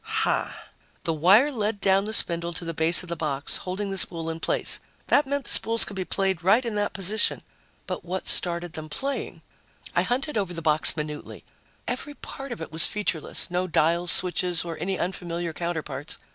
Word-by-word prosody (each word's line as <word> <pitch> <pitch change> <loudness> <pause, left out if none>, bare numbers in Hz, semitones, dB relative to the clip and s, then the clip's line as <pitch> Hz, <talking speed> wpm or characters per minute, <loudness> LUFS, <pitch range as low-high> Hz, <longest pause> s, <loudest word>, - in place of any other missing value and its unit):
Hah! 445 0 0 0.5
The 165 - -1
wire 195 - +4
led 215 -4 -2
down 195 0 +2
the 215 - -4
spindle 170 -3 +4
to 170 - -5
the 165 - -4
base 165 +3 +3
of 180 - -9
the 170 - -3
box, 145 -3 -2
holding 195 +2 -4
the 195 - 0
spool 165 -2 +1
in 160 - -7
place. - - 0 0.3
That 290 -1 +4
meant 280 0 -2
the - - -4
spools 230 +1 +4
could 205 - -8
be 190 -1 -3
played 190 -3 -1
right 215 +7 +3
in 230 - -2
that 205 0 -1
position. 205 +3 +1 0.4
But - - -5
what 185 +2 -5
started 175 -1 +1
them 155 0 -7
playing? 275 - -5 0.5
I - - +4
hunted 265 0 -1
over 185 -3 -4
the 165 - -5
box 155 0 +7
minutely. 150 -1 -6 0.4
Every 290 -1 -4
part 275 -1 -8
of 240 - -6
it - - -7
was 160 +1 +6
featureless 185 -5 -2
no 180 +1 -1
dials, 170 +1 +1
switches 175 -1 +2
or 165 -1 -5
any 190 0 -2
unfamiliar 175 -2 -4
counterparts. 155 -4 -4
180 Hz, 195 wpm, -25 LUFS, 165-210 Hz, 0.5 s, box